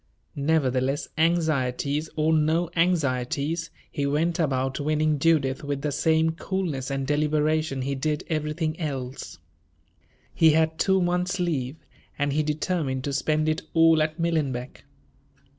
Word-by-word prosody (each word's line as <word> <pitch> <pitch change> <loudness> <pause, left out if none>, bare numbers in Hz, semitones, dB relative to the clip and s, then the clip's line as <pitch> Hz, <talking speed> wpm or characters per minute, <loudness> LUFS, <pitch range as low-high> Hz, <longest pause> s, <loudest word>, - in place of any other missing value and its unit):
Nevertheless, 140 -2 0
anxieties 155 -3 0
or 155 +1 +2
no 160 +2 +2
anxieties, 155 -1 0 0.2
he 140 -1 -1
went 165 +5 0
about 135 -4 0
winning 155 0 +1
Judith 140 -4 +2
with 145 -1 -3
the 150 - 0
same 160 +2 +2
coolness 165 -6 -3
and 135 -1 -2
deliberation 150 -1 0
he 140 +1 -1
did 150 +2 -1
everything 155 +1 -2
else. 135 -5 -5 1.0
He 160 -2 +5
had 160 0 +1
two 190 -1 +3
months' 180 +2 0
leave, 145 -6 -1 0.4
and 145 -1 0
he 155 - +2
determined 150 -3 -1
to 140 - -3
spend 155 +2 +1
it 155 0 0
all 165 -1 +5
at 155 +2 -1
Millenbeck. 145 -7 -2
155 Hz, 130 wpm, -25 LUFS, 140-160 Hz, 1.0 s, He